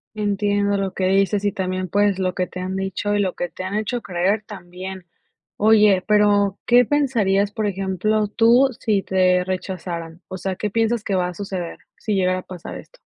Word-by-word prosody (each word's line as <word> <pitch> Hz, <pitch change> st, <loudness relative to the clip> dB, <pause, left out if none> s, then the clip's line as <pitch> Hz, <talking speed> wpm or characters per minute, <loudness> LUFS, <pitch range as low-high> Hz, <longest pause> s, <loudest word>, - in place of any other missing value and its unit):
Entiendo, 205 Hz, -1 st, 0 dB
lo 195 Hz, -1 st, -2 dB
que 185 Hz, -, -1 dB
dices 195 Hz, +1 st, +2 dB
y 205 Hz, -, +2 dB
también, 185 Hz, -2 st, -3 dB
pues, 205 Hz, +1 st, +2 dB
lo 185 Hz, -1 st, 0 dB
que 180 Hz, -1 st, -1 dB
te 185 Hz, -, -8 dB
han 185 Hz, +1 st, -3 dB
dicho 195 Hz, +2 st, -2 dB
y -, -, +1 dB
lo 190 Hz, -3 st, 0 dB
que 175 Hz, -, -3 dB
te -, -, -8 dB
han 190 Hz, +2 st, -4 dB
hecho 220 Hz, +3 st, -2 dB
creer 190 Hz, +3 st, 0 dB
también. 185 Hz, -2 st, -8 dB, 0.5 s
Oye, 210 Hz, -3 st, +5 dB
pero, 205 Hz, -2 st, +3 dB
¿qué 245 Hz, +1 st, +5 dB
pensarías, 215 Hz, -8 st, +1 dB
por 210 Hz, 0 st, -2 dB
ejemplo, 195 Hz, +2 st, 0 dB
tú, 235 Hz, +5 st, +4 dB
sí 205 Hz, -3 st, +1 dB
te 185 Hz, -1 st, +2 dB
rechazaran? 180 Hz, -3 st, -5 dB
O 185 Hz, -, -6 dB
sea, 190 Hz, 0 st, -3 dB
¿qué 210 Hz, -, -3 dB
piensas 225 Hz, 0 st, +1 dB
que 200 Hz, -, -1 dB
va 180 Hz, -1 st, +1 dB
a -, -, -7 dB
suceder 185 Hz, -3 st, -5 dB, 0.2 s
sí 215 Hz, -, -3 dB
llegara 185 Hz, -1 st, +1 dB
a -, -, -7 dB
pasar 180 Hz, -2 st, -8 dB
esto? -, -, -17 dB
195 Hz, 195 wpm, -21 LUFS, 185-210 Hz, 0.5 s, Oye